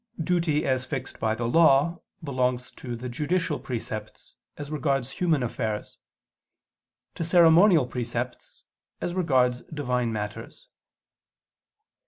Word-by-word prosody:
Duty 160 -2 +1
as 130 -1 +1
fixed 135 -1 -6
by 110 0 0
the 120 +1 -3
Law, 160 +4 +4 0.2
belongs 125 -3 -1
to 120 -2 -7
the 120 +2 -6
judicial 155 +5 -1
precepts, 110 -3 -6 0.2
as 145 0 -7
regards 135 -4 -1
human 160 -7 +1
affairs; 110 -3 -4 1.1
to - - -8
the 165 - -2
ceremonial 170 -1 +6
precepts, 120 0 -5 0.4
as 175 - -3
regards 130 -9 +2
Divine 125 -6 -1
matters. 105 -1 -6
130 Hz, 115 wpm, -26 LUFS, 120-160 Hz, 1.1 s, ceremonial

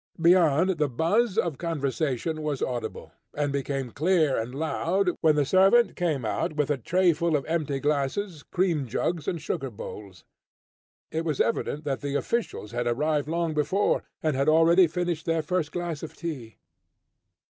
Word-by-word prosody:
Beyond, 170 0 +4
the 150 -2 +2
buzz 195 - +1
of 170 - 0
conversation 155 -1 -2
was 150 -3 -2
audible, 120 -2 -4 0.2
and 145 -1 -1
became 135 -2 -2
clear 160 -2 +2
and 115 +3 -3
loud, 175 +5 0
when 155 -2 +4
the 145 -1 +2
servant 195 - +4
came 155 -9 -1
out 110 - -1
with 150 -1 0
a 145 - +1
trayful 170 +2 +2
of 140 - -5
empty 155 -4 -1
glasses, 150 +5 -1
cream 170 -7 0
jugs 155 +7 -2
and 170 - -1
sugar 135 -2 -3
bowls. 100 -4 -9 0.9
It 160 +1 -2
was 155 -4 -2
evident 155 -9 0
that 140 -3 -2
the 140 -1 -3
officials 200 - -2
had 120 0 -2
arrived 150 +4 0
long 165 0 -1
before, 170 +7 +1 0.2
and 155 -3 +1
had 140 +3 +2
already 165 +3 +6
finished 175 -1 -3
their 165 -1 +1
first 165 -1 -1
glass 175 -4 -4
of 160 - -8
tea. 130 - -6
155 Hz, 160 wpm, -26 LUFS, 140-170 Hz, 0.9 s, already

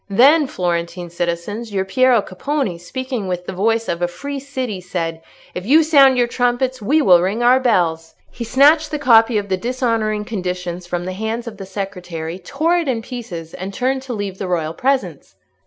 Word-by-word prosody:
Then, 280 +9 +5
Florentine 175 -2 -3
citizens! 175 +7 -3
your 190 -1 -1
Piero 250 +2 +3
Capponi, 205 - -3
speaking 250 +3 -4
with 180 -1 -3
the - - -5
voice 225 +4 0
of 170 0 -2
a 175 - +2
free 280 +11 -6
city, 260 -8 -4
said, 165 -2 -4 0.3
'If 180 - -5
you 300 +10 +5
sound 275 -4 +5
your 245 - +4
trumpets, 245 +1 0
we 295 +9 +2
will 180 -7 +6
ring 200 +6 -1
our 250 +2 +5
bells!' 170 -10 0 0.2
He 240 - -6
snatched 295 +6 +4
the 300 - -2
copy 230 -4 +5
of 205 -1 -2
the 190 -1 0
dishonouring 230 -2 -1
conditions 180 -4 -4
from 175 0 -3
the 185 - -4
hands 220 +4 -3
of 225 -3 -8
the 195 -1 -8
secretary, 180 -4 -5
tore 310 - 0
it 335 -3 -1
in 235 -4 -1
pieces, 210 -11 -7
and 195 +2 -6
turned 260 +1 0
to 260 -2 -6
leave 200 -3 -5
the 190 - -3
royal 165 -3 -1
presence." 265 +6 -2
215 Hz, 190 wpm, -19 LUFS, 180-255 Hz, 0.3 s, will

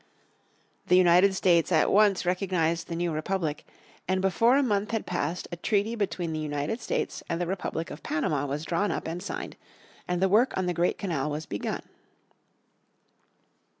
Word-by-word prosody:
The 180 - +5
United 185 +2 +5
States 175 -2 +3
at 160 -3 +3
once 200 -3 +4
recognized 175 -2 0
the 170 - -4
new 170 0 -1
republic, 155 -1 -2 0.4
and 185 +1 +1
before 230 +7 +3
a 285 - +3
month 205 -4 0
had 225 -2 -2
passed 175 0 -2
a - - -3
treaty 205 +4 0
between 185 -6 -2
the 155 - -2
United 150 +9 -3
States - - -2
and 165 - -1
the 175 - 0
Republic 175 -2 -3
of 150 - -8
Panama 145 -2 -1
was 145 +3 -3
drawn 180 +5 0
up - - -3
and 170 +2 -4
signed, 200 - -6 0.5
and 180 0 -1
the 190 - +3
work 220 +7 +3
on 190 - 0
the 180 - 0
great 175 +1 +1
canal 155 -7 -2
was 150 +1 -4
begun. 100 - -4
180 Hz, 175 wpm, -27 LUFS, 160-195 Hz, 0.5 s, The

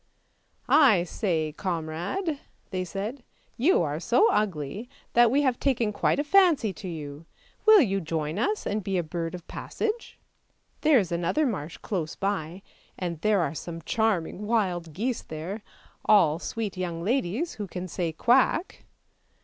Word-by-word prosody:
" - - -40 0.2
I 180 -5 +3
say, 165 -4 -1
comrade," 180 - -3 0.3
they 185 -1 -1
said, 205 +9 -5 0.2
" - - -38
you 380 +7 +5
are - - -2
so 440 - +3
ugly 200 - -2 0.2
that 240 -1 +6
we 280 +5 +2
have 255 -3 +1
taken 235 -6 +1
quite - - +1
a 290 - +1
fancy 310 - +4
to 190 +1 -8
you; 155 -2 -7 0.4
will 435 -3 +9
you 195 -7 +1
join 160 +1 -2
us 420 - 0
and 210 0 -1
be 195 0 -1
a 175 - +1
bird 165 +1 -4
of 175 - -11
passage? 450 +1 -4 0.6
There 305 -3 +5
is 190 -6 0
another 175 - +1
marsh 175 - -3
close 170 -6 -3
by, 190 -2 -3 0.3
and 170 -3 -4
there 210 -1 +3
are 150 -3 -1
some 165 0 -7
charming 210 -2 0
wild 185 -7 0
geese 230 - -2
there; 170 +7 -6 0.4
all 165 -7 +4
sweet 215 0 -4
young 170 -2 -3
ladies, 245 - 0
who 205 - -3
can 180 0 -5
say 165 +1 -2
quack! 250 - +2
195 Hz, 160 wpm, -27 LUFS, 165-240 Hz, 0.6 s, will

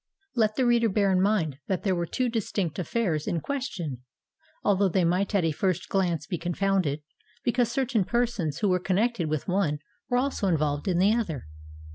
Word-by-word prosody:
Let 215 -3 +2
the 255 - +2
reader 235 -1 +4
bear 200 0 +2
in 185 -1 +3
mind 180 -9 +1
that 190 - -1
there 195 - +2
were 175 -1 -1
two 255 +7 0
distinct 200 -7 -2
affairs 175 -4 -1
in 170 - 0
question; 185 - -4 0.6
although 200 -1 +3
they 185 +1 +2
might 185 +5 +1
at 185 -4 +3
a 160 - +2
first 185 +3 -1
glance 175 -5 0
be 175 -2 -3
confounded, 175 -4 0 0.4
because 240 -1 +1
certain 245 -4 +1
persons 230 -9 0
who 205 - +3
were 180 0 +3
connected 190 -1 0
with 155 -2 -2
one 180 -6 +1 0.3
were 245 - +2
also 255 -5 0
involved 150 -3 0
in 180 -2 +2
the 195 +4 +4
other. 175 - -2
190 Hz, 185 wpm, -27 LUFS, 170-225 Hz, 0.6 s, reader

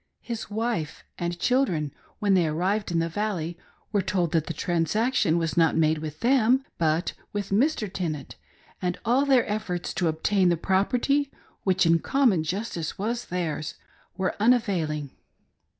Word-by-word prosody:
His 230 -3 -5
wife 215 -7 -2 0.2
and 175 0 -2
children, 175 - +1 0.2
when 205 -2 +2
they 180 -3 +4
arrived 185 +7 0
in 170 - +1
the 165 0 +1
Valley, 175 -2 -2 0.4
were 205 -3 +2
told 185 -3 0
that 160 -2 +1
the - - -2
transaction 180 - +1
was 165 -2 -1
not 165 -1 +3
made 155 -1 +3
with 155 -1 -7
them 255 +1 +4 0.2
but 160 +1 +1 0.2
with 205 -1 -3
Mr. 230 +2 +2
Tenant, 165 -7 -4 0.5
and 180 -1 -1
all 255 +5 +3
their 265 -3 +4
efforts 205 -5 -3
to 175 - 0
obtain 180 +4 +2
the 170 - +2
property, 245 - +1 0.3
which 185 -2 +3
in 165 0 +4
common 240 - +2
justice 175 -2 -3
was 230 +4 -2
theirs, 165 -3 -3 0.4
were 190 -1 -1
unavailing. 185 - +1
185 Hz, 150 wpm, -26 LUFS, 165-220 Hz, 0.5 s, they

